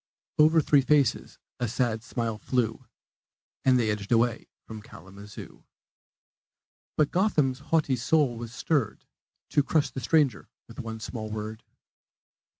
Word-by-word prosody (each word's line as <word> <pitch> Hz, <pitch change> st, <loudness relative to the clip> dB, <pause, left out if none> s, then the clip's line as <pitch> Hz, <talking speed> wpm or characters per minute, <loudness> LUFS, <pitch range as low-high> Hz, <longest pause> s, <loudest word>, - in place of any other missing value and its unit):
Over 155 Hz, +1 st, +6 dB
three 145 Hz, -1 st, +4 dB
faces 140 Hz, -2 st, +1 dB, 0.2 s
a 120 Hz, -, 0 dB
sad 115 Hz, -1 st, -1 dB
smile 115 Hz, -2 st, -3 dB
flew, 115 Hz, -3 st, -1 dB, 0.8 s
And 130 Hz, -1 st, +5 dB
they 110 Hz, -3 st, +1 dB
edged 105 Hz, 0 st, -5 dB
away 115 Hz, 0 st, +2 dB, 0.2 s
from 110 Hz, -1 st, -8 dB
Kalamazoo. 100 Hz, +1 st, -12 dB, 1.3 s
But 150 Hz, -2 st, +2 dB
Gotham's 150 Hz, -9 st, +1 dB
haughty 155 Hz, -5 st, +2 dB
soul 125 Hz, +1 st, +2 dB
was 115 Hz, 0 st, -7 dB
stirred 135 Hz, -1 st, -1 dB, 0.4 s
To 145 Hz, -, +3 dB
crush 150 Hz, +1 st, +1 dB
the -, -, -5 dB
stranger 140 Hz, -3 st, +1 dB, 0.2 s
with -, -, -12 dB
one 110 Hz, -1 st, -5 dB
small 110 Hz, -1 st, -6 dB
word. 110 Hz, +1 st, -6 dB
120 Hz, 130 wpm, -27 LUFS, 110-145 Hz, 1.3 s, Over